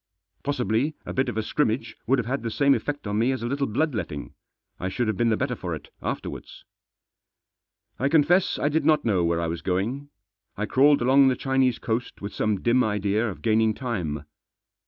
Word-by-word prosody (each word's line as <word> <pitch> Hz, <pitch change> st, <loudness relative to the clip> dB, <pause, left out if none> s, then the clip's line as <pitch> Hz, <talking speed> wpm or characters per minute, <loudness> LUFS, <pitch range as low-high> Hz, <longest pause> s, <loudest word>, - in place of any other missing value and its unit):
Possibly 140 Hz, +1 st, 0 dB
a -, -, -5 dB
bit 130 Hz, -, +1 dB
of -, -, -5 dB
a 110 Hz, -, 0 dB
scrimmage 115 Hz, 0 st, -1 dB
would 135 Hz, +3 st, +4 dB
have 125 Hz, -, -1 dB
had 135 Hz, +4 st, -2 dB
the 115 Hz, -, -3 dB
same 140 Hz, +4 st, +3 dB
effect 145 Hz, -2 st, -3 dB
on 105 Hz, +1 st, -1 dB
me 120 Hz, +4 st, +3 dB
as 130 Hz, -3 st, -3 dB
a -, -, -2 dB
little 140 Hz, +3 st, -1 dB
blood 145 Hz, +7 st, 0 dB
letting. 75 Hz, -10 st, -5 dB, 0.5 s
I 95 Hz, -, -2 dB
should 120 Hz, +5 st, -1 dB
have 110 Hz, -, 0 dB
been 115 Hz, +4 st, +2 dB
the 110 Hz, -, +2 dB
better 130 Hz, -1 st, -1 dB
for 90 Hz, -6 st, -4 dB
it 75 Hz, -, -11 dB
afterwards. -, -, -6 dB, 1.3 s
I 135 Hz, -, +1 dB
confess 165 Hz, +5 st, +3 dB
I -, -, 0 dB
did 155 Hz, +2 st, +1 dB
not 155 Hz, -2 st, +3 dB
know 100 Hz, -6 st, +2 dB
where 85 Hz, 0 st, +1 dB
I 85 Hz, -, -1 dB
was 85 Hz, 0 st, -3 dB
going. 110 Hz, -, -2 dB, 0.5 s
I 105 Hz, -, -1 dB
crawled 140 Hz, +3 st, +4 dB
along 135 Hz, +2 st, +6 dB
the 130 Hz, -, +3 dB
Chinese 135 Hz, -2 st, +1 dB
coast 115 Hz, +1 st, -3 dB
with 100 Hz, +1 st, -6 dB
some 105 Hz, -3 st, 0 dB
dim 125 Hz, +2 st, +4 dB
idea 105 Hz, +1 st, 0 dB
of 95 Hz, -, -9 dB
gaining 110 Hz, -1 st, +3 dB
time. 90 Hz, -, -3 dB
120 Hz, 205 wpm, -25 LUFS, 105-140 Hz, 1.3 s, along